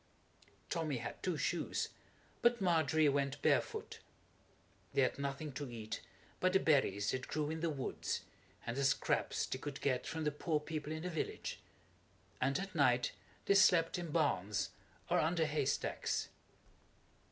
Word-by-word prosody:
Tommy 160 -6 -1
had 120 0 -6
two 180 -4 0
shoes, 175 +3 -1 0.5
but 235 0 +4
Margery 160 -4 +3
went 140 0 +1
barefoot. - - +1 0.9
They 135 - +4
had 130 - 0
nothing 140 +2 -3
to 140 0 -5
eat 110 -2 -5 0.4
but 185 0 +2
the 190 - +6
berries 105 - +3
that 130 0 -3
grew 150 0 -1
in 160 - -3
the 170 +1 0
woods, 140 -4 -2 0.4
and 115 - -2
the 140 - 0
scraps 135 - +1
they 130 - -4
could 145 0 -5
get 130 -3 0
from 160 -1 -3
the 150 - +1
poor 150 +1 0
people 150 0 -4
in 155 +1 -4
the 180 - -2
village, 160 - -3 0.8
and 135 +2 +2
at 195 0 -4
night 125 -6 +3 0.3
they - - +5
slept 180 -4 +5
in 170 -2 -4
barns 105 - +1 0.4
or - - +3
under 160 +1 +2
hay 150 -2 0
stacks. - - -1
150 Hz, 155 wpm, -36 LUFS, 135-165 Hz, 0.9 s, the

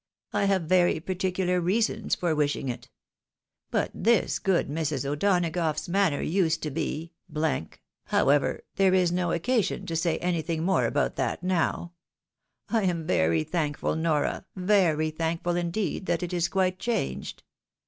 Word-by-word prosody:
I 200 - +2
have 195 -3 +2
very 175 0 +3
particular 180 +1 -1
reasons 215 +4 +1
for 175 -3 0
wishing 145 -3 0
it. 120 -2 -6 0.8
But - - 0
this 230 -3 +2
good 190 -3 +1
Mrs. 145 -3 -2
O'Donagough's 165 0 0
manner 180 -4 +1
used 165 -2 +1
to 150 - -2
be 160 +2 -3 1.0
however, 140 +1 +2
there 190 -1 +4
is 180 -2 +3
no 175 -1 0
occasion 200 +2 0
to 165 -3 -4
say 165 0 +1
anything 165 -2 -1
more 190 +2 +2
about - - 0
that - - -2
now; 175 -1 0 0.7
I 225 - +1
am 170 -3 -1
very 80 - +2
thankful, 150 - -1
Nora, 160 +2 0
very 180 -5 +2
thankful, 165 +2 -1
indeed, 175 +3 -2
that 175 0 0
it 180 0 -4
is 170 -1 +1
quite 185 0 0
changed. 235 +2 -3
175 Hz, 140 wpm, -27 LUFS, 160-185 Hz, 1.0 s, there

